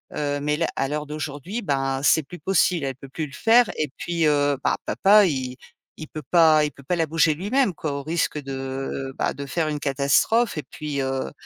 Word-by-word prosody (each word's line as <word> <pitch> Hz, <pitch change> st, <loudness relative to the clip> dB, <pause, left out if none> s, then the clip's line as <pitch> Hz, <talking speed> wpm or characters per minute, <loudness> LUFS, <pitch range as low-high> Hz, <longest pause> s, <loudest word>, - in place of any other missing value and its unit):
Heu, 145 Hz, -1 st, -1 dB
mais 150 Hz, +1 st, 0 dB
là, 165 Hz, -, 0 dB
à 135 Hz, -, 0 dB
l'heure 150 Hz, 0 st, -3 dB
d'aujourd'hui, 155 Hz, -, -5 dB
ben, 135 Hz, -3 st, -1 dB
c'est 160 Hz, +1 st, +4 dB
plus 175 Hz, +5 st, -11 dB
possible, 180 Hz, -5 st, +1 dB
elle 135 Hz, -2 st, -3 dB
peut 135 Hz, +1 st, -12 dB
plus 155 Hz, +3 st, -4 dB
le 140 Hz, -, -16 dB
faire 225 Hz, +9 st, +4 dB
et 155 Hz, -3 st, -1 dB
puis, 170 Hz, -2 st, 0 dB
heu, 145 Hz, -1 st, +2 dB
bah, -, -, +1 dB
papa 205 Hz, +1 st, +5 dB
il 130 Hz, -5 st, -2 dB, 0.4 s
il 155 Hz, -, -8 dB
peut 155 Hz, -, -7 dB
pas 160 Hz, -3 st, +5 dB
il 150 Hz, -, -3 dB
peut 140 Hz, -, -16 dB
pas 180 Hz, +6 st, -1 dB
la 165 Hz, -1 st, +1 dB
bouger 160 Hz, 0 st, +3 dB
lui-même 205 Hz, -, +1 dB
quoi, 150 Hz, -2 st, -4 dB
au 140 Hz, 0 st, -4 dB
risque 155 Hz, -1 st, -1 dB
de, 135 Hz, 0 st, -5 dB
bah, -, -, 0 dB
de 140 Hz, -, -7 dB
faire 155 Hz, +3 st, -1 dB
une 150 Hz, -1 st, -3 dB
catastrophe. 145 Hz, -, +2 dB
Et 150 Hz, -, -3 dB
puis, 145 Hz, -2 st, -5 dB
heu, 135 Hz, 0 st, -2 dB
150 Hz, 220 wpm, -23 LUFS, 140-165 Hz, 0.4 s, papa